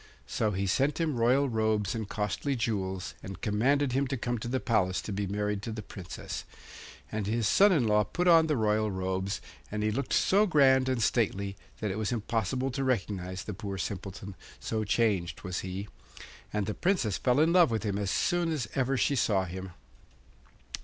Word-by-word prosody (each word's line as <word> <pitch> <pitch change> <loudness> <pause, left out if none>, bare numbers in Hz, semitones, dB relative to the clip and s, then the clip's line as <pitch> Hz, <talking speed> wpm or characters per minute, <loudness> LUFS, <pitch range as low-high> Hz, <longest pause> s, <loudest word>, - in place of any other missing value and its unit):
So 110 - 0
he 100 -1 -1
sent 135 - +1
him 160 -4 0
royal 125 +4 +3
robes 110 -5 0
and 110 -3 -4
costly 110 +7 -1
jewels, 95 -5 -2
and 95 0 -8
commanded 130 +6 +2
him 135 +2 +1
to 135 +1 -2
come 120 0 -2
to 120 - -5
the 130 +2 0
palace 95 -7 +1
to - - -5
be 100 0 -2
married 105 +1 -1
to 115 - -5
the 110 -1 -5
Princess. 95 -2 -7 0.7
And 105 -2 -2
his 115 0 +1
son 200 +1 +6
in 150 -10 +3
law 105 -1 +4
put 175 - -2
on 165 -2 +7
the 150 -3 +1
royal 110 -1 +2
robes, 95 +1 -2 0.3
and 105 0 -2
he 105 - +1
looked 135 +6 -2
so 205 +3 +4
grand 130 -5 +4
and 125 -3 +1
stately 100 -4 0 0.3
that 105 - -1
it 100 - -3
was 110 +1 -1
impossible 120 +3 -1
to 135 +2 -2
recognise 95 -7 -2
the 105 - -5
poor 100 0 -5
Simpleton, 95 +1 -5 0.3
so 110 -1 -2
changed 105 -5 0
was 90 -2 -3
he; 95 +2 -5 0.6
and 105 -1 -1
the 105 - -2
Princess 170 - 0
fell 125 +1 +2
in 160 +2 +4
love 175 -4 +6
with 115 -1 -1
him 100 -2 -1
as 100 -2 -1
soon 175 - +1
as 140 -8 -2
ever 135 0 +1
she 140 - +2
saw 100 -6 +2
him. 95 +1 -6
110 Hz, 195 wpm, -29 LUFS, 100-130 Hz, 0.7 s, on